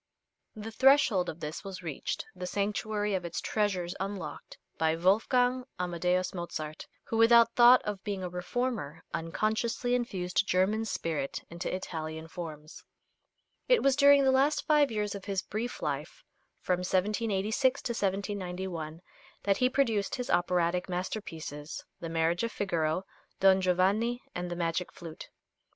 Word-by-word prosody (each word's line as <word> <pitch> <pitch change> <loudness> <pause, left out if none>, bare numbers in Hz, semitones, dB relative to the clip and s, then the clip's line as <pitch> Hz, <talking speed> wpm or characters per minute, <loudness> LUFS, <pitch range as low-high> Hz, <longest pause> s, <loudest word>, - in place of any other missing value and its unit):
The 215 +1 -7
threshold 240 -7 +4
of 165 - -8
this 150 +5 -5
was 190 -2 -7
reached, 155 -5 -4
the 180 0 -5
sanctuary 205 +1 -1
of 185 -2 -1
its 170 -1 -4
treasures 190 -5 -1
unlocked, 190 -6 -6 0.2
by 160 0 +2
Wolfgang 245 +8 +2 0.2
Amadeus 180 +1 0
Mozart, 155 -4 -5 0.2
who, 225 - -3
without 230 0 +6
thought 245 +1 +7
of 205 -2 -4
being 200 -3 -3
a - - -2
reformer, 180 - -3
unconsciously 215 +9 -1
infused 195 -5 0
German 205 +5 +2
spirit 155 -9 -3
into 170 +2 -4
Italian 160 -3 -5
forms. 155 -2 -8 0.8
It - - +4
was 275 -1 +4
during 280 0 +6
the 265 - +4
last 280 +3 +2
five 295 -2 +4
years 210 -2 -2
of 200 -2 -8
his 195 -2 -1
brief 230 +4 -4
life, 150 +1 -4 0.4
from 180 -1 0
1786 210 +6 +1
to 240 - -2
1791, 185 -5 -3 0.4
that 195 -1 +2
he 255 0 +3
produced 230 -7 +1
his 250 -1 -3
operatic 180 0 +1
masterpieces, 165 -5 -5
"The 165 - -5
Marriage 165 +1 +1
of 230 0 -1
Figaro," 170 -4 -1 0.4
"Don 190 0 +5
Giovanni," 195 +7 +1
and 175 0 -4
"The 175 - -3
Magic 170 +1 -1
Flute." 165 -2 -10
190 Hz, 140 wpm, -30 LUFS, 170-225 Hz, 0.8 s, thought